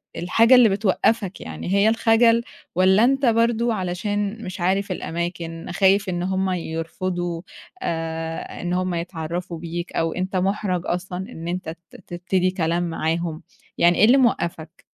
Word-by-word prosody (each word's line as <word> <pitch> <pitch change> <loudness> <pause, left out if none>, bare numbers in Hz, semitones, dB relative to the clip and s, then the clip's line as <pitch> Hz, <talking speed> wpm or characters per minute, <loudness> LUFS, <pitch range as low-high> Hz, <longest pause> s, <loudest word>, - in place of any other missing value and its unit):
الحاجة 230 +8 +4
اللي 245 -3 +7
بتوقّفك 200 0 0
يعني 185 - -5
هي 200 +2 +4
الخجل 230 +1 +4 0.3
والّا 190 +4 +5
أنت 270 +2 +3
برضه 230 0 +2
علشان 205 +3 -2
مش 185 +1 -6
عارف 195 +2 0
الأماكن، 170 -1 -4
خايف 195 +2 +3
إن 175 0 -2
هُم 190 0 0
يرفضوا 175 0 -3 0.4
آآ 165 0 -4
إن 175 +1 -2
هُم 185 0 0
يتعرّفوا 170 0 -4
بيك 170 +1 -5
أو 165 0 0
أنت 185 +1 -3
مُحرَج 185 -1 0
أصلًا 180 +1 -3
إن 165 +1 -8
أنت 180 -1 -3 0.2
ت - - -16
تبتدي 180 +1 0
كلام 170 -1 0
معاهم، 165 0 -2 0.3
يعني 175 0 +4
إيه 215 - +6
اللي 255 +4 +6
موقّفَك؟ 170 -9 -1
185 Hz, 145 wpm, -22 LUFS, 170-205 Hz, 0.4 s, اللي